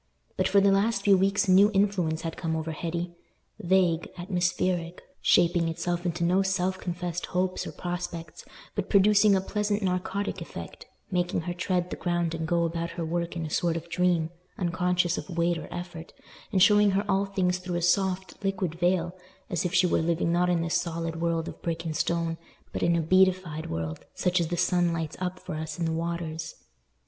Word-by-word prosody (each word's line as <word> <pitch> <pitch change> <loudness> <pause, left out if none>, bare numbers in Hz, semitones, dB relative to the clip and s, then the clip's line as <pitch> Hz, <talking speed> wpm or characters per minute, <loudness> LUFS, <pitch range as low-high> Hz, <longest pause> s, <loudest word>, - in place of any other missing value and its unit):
But - - +1
for 200 - +4
the 200 0 +4
last 200 +1 +2
few 200 -1 +6
weeks 195 +3 +2
a - - +4
new 195 +3 +7
influence 185 -6 +1
had 165 -1 -3
come 160 -1 -2
over 160 0 -3
Hetty—vague, 175 +1 -2
atmospheric, 175 -1 -1 0.2
shaping 170 -1 +4
itself 175 +2 -2
into 170 0 -2
no 180 +3 +3
self 190 -1 0
confessed 175 -1 -4
hopes 185 0 -1
or - - -5
prospects, 175 -2 -5 0.3
but 205 -2 -3
producing 205 +1 +5
a 190 - +2
pleasant 210 +1 -1
narcotic 190 +2 -2
effect, - - -8 0.2
making 175 -2 0
her 175 +2 -4
tread 180 0 -1
the - - -2
ground 175 -2 -1
and 160 -1 -3
go 170 0 +2
about 170 0 -2
her 170 - -2
work 170 +1 -2
in 165 -2 -3
a 155 - -6
sort 170 0 +1
of 165 +1 -8
dream, 175 -2 +1 0.3
unconscious 180 -1 +1
of 175 -3 -8
weight 170 0 +2
or 155 - -9
effort, 175 -2 -7 0.4
and 190 -3 +4
showing 210 0 +6
her 200 +2 +1
all 195 0 +2
things 180 -2 0
through 180 -1 -4
a 175 - -1
soft, 190 +1 0
liquid 195 -4 -1
veil, 175 0 +1 0.4
as 180 -1 0
if 180 - 0
she 185 -1 +5
were 175 - +2
living 170 0 +1
not 175 +1 +2
in 175 -2 +2
this 170 +2 +1
solid 165 -1 -4
world 165 -1 0
of - - -8
brick 165 0 -3
and 160 -1 -3
stone, 165 0 -1 0.3
but - - -3
in 170 - +3
a 170 - +2
beatified 185 -2 +2
world, 80 -1 -4
such 180 0 +1
as 165 - 0
the 175 +1 -2
sun 175 -1 +2
lights 165 -2 -3
up 185 0 -3
for 185 - -7
us 155 0 -5
in 170 - -1
the 165 - 0
waters. 165 -1 -3
175 Hz, 195 wpm, -27 LUFS, 165-185 Hz, 0.4 s, new